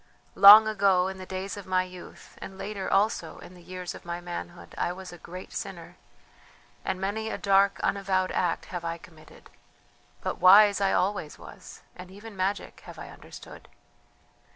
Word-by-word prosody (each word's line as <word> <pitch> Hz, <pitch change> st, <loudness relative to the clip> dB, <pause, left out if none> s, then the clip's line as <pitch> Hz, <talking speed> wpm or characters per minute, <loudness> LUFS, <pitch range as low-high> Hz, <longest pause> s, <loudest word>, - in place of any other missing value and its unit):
Long 210 Hz, +2 st, +9 dB
ago, 195 Hz, -4 st, +2 dB
in 190 Hz, 0 st, -7 dB
the 185 Hz, -, -9 dB
days 190 Hz, +2 st, -5 dB
of 200 Hz, -, -10 dB
my 185 Hz, 0 st, +1 dB
youth, 180 Hz, -1 st, -13 dB
and 190 Hz, -, -9 dB
later 200 Hz, -1 st, -5 dB
also 195 Hz, -4 st, 0 dB
in 180 Hz, -, -13 dB
the 180 Hz, -, -16 dB
years 180 Hz, 0 st, -7 dB
of -, -, -12 dB
my 175 Hz, 0 st, -5 dB
manhood, 175 Hz, 0 st, -8 dB
I -, -, -1 dB
was 185 Hz, 0 st, -9 dB
a -, -, -11 dB
great 180 Hz, +3 st, -10 dB
sinner, -, -, -7 dB, 0.9 s
and 190 Hz, -1 st, -3 dB
many 210 Hz, +3 st, -3 dB
a -, -, -4 dB
dark 200 Hz, 0 st, +2 dB
unavowed 190 Hz, -2 st, 0 dB
act 175 Hz, -2 st, -1 dB
have 175 Hz, -1 st, -4 dB
I 165 Hz, 0 st, -4 dB
committed. 160 Hz, -2 st, -18 dB, 0.7 s
But -, -, -4 dB
wise 200 Hz, +2 st, +6 dB
I 195 Hz, -, +2 dB
always 185 Hz, -5 st, -1 dB
was, -, -, -13 dB
and 180 Hz, 0 st, -11 dB
even 205 Hz, +3 st, -12 dB
magic 195 Hz, +2 st, -3 dB
have -, -, -11 dB
I -, -, -9 dB
understood. -, -, -13 dB
190 Hz, 175 wpm, -27 LUFS, 180-200 Hz, 0.9 s, Long